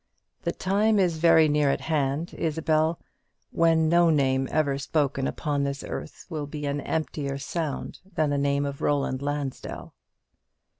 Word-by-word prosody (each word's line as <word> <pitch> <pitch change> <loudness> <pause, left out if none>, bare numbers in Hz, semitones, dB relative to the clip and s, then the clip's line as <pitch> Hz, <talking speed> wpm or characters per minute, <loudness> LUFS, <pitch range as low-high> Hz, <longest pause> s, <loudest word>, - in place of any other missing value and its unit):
The - - -1
time 205 +3 +1
is 175 -5 +2
very 160 -1 +6
near 150 -1 +2
at - - 0
hand, 150 +1 -1
Isabel, 160 0 0 0.5
when 165 -1 +3
no 170 +1 +5
name 135 -3 +2
ever 140 -3 +1
spoken 140 -2 0
upon 145 -3 -1
this 140 0 -3
earth - - -7
will 155 -4 -4
be 150 0 -5
an 145 0 -1
emptier 145 -3 -2
sound 150 +1 -4 0.2
than 155 -2 +1
the 145 - +1
name 140 0 +1
of 140 -1 -5
Roland 140 -2 0
Lansdell." 145 -2 -4
150 Hz, 150 wpm, -26 LUFS, 140-160 Hz, 0.5 s, very